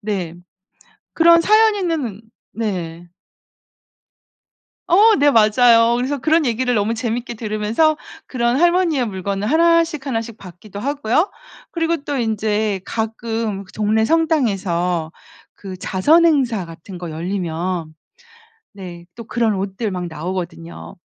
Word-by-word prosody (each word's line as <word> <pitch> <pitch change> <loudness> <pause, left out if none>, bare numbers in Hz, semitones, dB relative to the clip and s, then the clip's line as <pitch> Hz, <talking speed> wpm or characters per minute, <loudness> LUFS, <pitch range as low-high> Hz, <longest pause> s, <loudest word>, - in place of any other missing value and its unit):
네 195 -6 -3 0.8
그런 335 0 +6
사연 435 +4 +4
있는 315 - -3 0.3
네. 175 -6 -4 1.8
어 425 +6 +6
네 290 0 +4
맞아요. 230 +1 +5
그래서 265 +3 -2
그런 315 +4 +2
얘기를 245 +1 0
너무 215 +2 0
재밌게 235 +1 -3
들으면서 220 +8 0 0.3
그런 240 0 0
할머니의 345 -7 +2
물건을 195 +1 -3
1 335 +1 +4
씩 305 -4 -8
1 230 -4 -1
씩 230 -1 -10
받기도 190 +2 -11
하고요. 285 - 0 0.4
그리고 335 0 0
또 285 - -3
인제 215 -3 -1
가끔 225 -2 -3
그 190 - -19
동네 215 +1 +1
성당에서 195 - 0 0.4
그 190 -2 -9
자선 290 - +3
행사 250 - +1
같은 165 +3 -11
거 175 -2 -6
열리면 170 -1 -3 0.8
네 175 -3 -10
또 230 - -8
그런 225 -2 0
옷들 195 +2 -3
막 180 -1 -4
나오거든요. 170 0 -6
220 Hz, 240 characters per minute, -19 LUFS, 190-285 Hz, 1.8 s, 그런